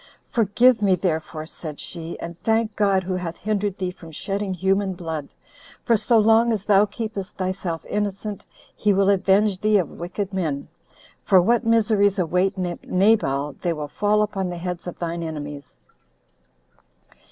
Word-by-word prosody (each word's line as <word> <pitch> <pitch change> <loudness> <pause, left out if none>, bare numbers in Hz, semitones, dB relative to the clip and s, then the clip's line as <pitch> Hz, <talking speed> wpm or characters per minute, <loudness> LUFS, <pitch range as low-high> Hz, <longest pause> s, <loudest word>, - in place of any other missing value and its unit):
"Forgive 235 0 +4
me, 195 -2 +4
therefore," 160 -3 -2
said 155 -2 -8
she, 165 -1 -7
"and 170 0 -6
thank 225 -1 +1
God, 195 -2 +2
who 185 +1 -3
hath 175 -1 -5
hindered 205 -2 -1
thee 185 -1 -2
from 170 -2 -13
shedding 195 +5 -3
human 190 +1 +1
blood; 160 -5 -5 0.6
for 235 - +4
so 220 +2 +3
long 225 +2 +5
as 210 -3 -2
thou 205 0 +5
keepest 210 -2 -6
thyself 185 -3 -3
innocent, 205 0 -3 0.3
he 210 -1 +2
will 195 +1 +4
avenge 195 0 +2
thee 215 0 +4
of 180 - -1
wicked 190 +3 -5
men, 155 -7 -2 0.6
25 - - -20
for 190 - +7
what 230 +6 +2
miseries 210 -3 +3
await 180 +2 +1
Nabal, 180 -5 +1
they 175 -2 0
will 150 -2 -5
fall 210 +7 +1
upon 195 -3 -2
the 175 - -5
heads 180 0 -5
of 175 - -6
thine 170 0 -3
enemies. 145 -3 -7
190 Hz, 160 wpm, -23 LUFS, 170-210 Hz, 0.6 s, for